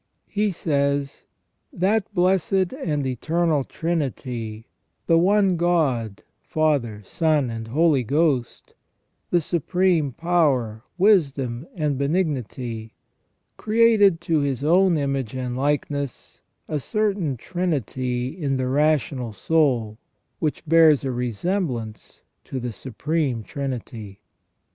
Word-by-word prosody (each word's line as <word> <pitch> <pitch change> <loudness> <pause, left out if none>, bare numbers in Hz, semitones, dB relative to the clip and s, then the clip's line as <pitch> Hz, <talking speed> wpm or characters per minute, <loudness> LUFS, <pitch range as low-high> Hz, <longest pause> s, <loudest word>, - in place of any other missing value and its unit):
He 210 0 0
says: 140 -5 -1 0.2
" - - -50
That 215 +1 +1
Blessed 185 0 +1
and 150 - -2
Eternal 155 +4 0
Trinity, 125 -9 -3 0.4
the 165 -1 +4
one 195 0 +3
God, 140 - 0 0.2
Father, 135 -10 0
Son, 150 - +1
and 115 0 -6
Holy 150 +2 +3
Ghost, 140 -1 0 0.6
the 175 - +3
Supreme 170 -1 +1
Power, 135 -9 +1 0.2
Wisdom, 140 - +2
and 150 -5 -1
Benignity, 130 - -2 0.6
created 215 -5 +4
to 165 -2 +1
His 140 -2 -1
own 175 +2 +4
image 135 -4 -2
and 125 -1 -3
likeness 140 0 -2 0.3
a 150 - -2
certain 195 - -1
trinity 130 - -2
in 145 -4 -2
the 130 - -1
rational 140 -4 +1
soul, 120 -5 +1 0.4
which 155 +1 -2
bears 160 -3 +5
a 135 - -1
resemblance 125 - -3 0.2
to 130 - -4
the 120 -1 -4
Supreme 135 +1 -2
Trinity. 115 -7 -6
145 Hz, 105 wpm, -23 LUFS, 125-170 Hz, 0.6 s, bears